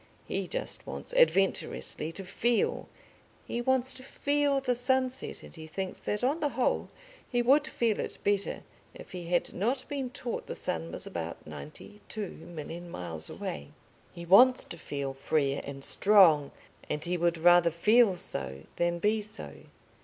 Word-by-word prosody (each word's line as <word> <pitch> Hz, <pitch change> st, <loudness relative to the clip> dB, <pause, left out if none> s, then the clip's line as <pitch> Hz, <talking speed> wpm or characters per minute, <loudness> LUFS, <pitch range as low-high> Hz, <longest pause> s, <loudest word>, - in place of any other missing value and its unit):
He -, -, -2 dB
just -, -, -4 dB
wants -, -, -6 dB
adventurously 195 Hz, -, +2 dB
to 195 Hz, -, -6 dB
feel. 235 Hz, +5 st, 0 dB, 0.6 s
He 240 Hz, -, -3 dB
wants 260 Hz, +1 st, +1 dB
to 260 Hz, -, -10 dB
feel 285 Hz, +1 st, +1 dB
the 260 Hz, -2 st, +1 dB
sunset, 255 Hz, +1 st, -1 dB
and -, -, -11 dB
he 160 Hz, -2 st, -9 dB
thinks 190 Hz, +4 st, -5 dB
that 210 Hz, +3 st, -2 dB
on 280 Hz, +6 st, +2 dB
the 295 Hz, -2 st, +1 dB
whole 255 Hz, -, +1 dB, 0.4 s
he 245 Hz, -1 st, +1 dB
would 280 Hz, +5 st, +4 dB
feel 230 Hz, -7 st, 0 dB
it -, -, -4 dB
better 200 Hz, -1 st, 0 dB, 0.3 s
if -, -, -11 dB
he 180 Hz, -3 st, -6 dB
had 175 Hz, 0 st, 0 dB
not 250 Hz, +7 st, -1 dB
been 275 Hz, -3 st, -3 dB
taught 245 Hz, -1 st, -5 dB
the -, -, -5 dB
sun 80 Hz, 0 st, -3 dB
was -, -, -5 dB
about 85 Hz, 0 st, -5 dB
ninety 75 Hz, -, -10 dB
two 210 Hz, -4 st, -4 dB
million 170 Hz, +1 st, -8 dB
miles 85 Hz, -, -4 dB
away. 70 Hz, -, -5 dB, 0.4 s
He 170 Hz, -, -9 dB
wants 250 Hz, +9 st, +7 dB
to 170 Hz, -, -9 dB
feel 140 Hz, -3 st, -4 dB
free 140 Hz, +1 st, +1 dB
and 135 Hz, -1 st, -7 dB
strong, 180 Hz, -9 st, +5 dB, 0.4 s
and 150 Hz, -, -2 dB
he 175 Hz, +1 st, -1 dB
would 170 Hz, 0 st, +1 dB
rather 175 Hz, +1 st, +6 dB
feel 210 Hz, +4 st, +4 dB
so 70 Hz, -, -5 dB
than 175 Hz, 0 st, +1 dB
be 210 Hz, +4 st, +1 dB
so. 215 Hz, +2 st, -9 dB
190 Hz, 165 wpm, -30 LUFS, 160-245 Hz, 0.6 s, wants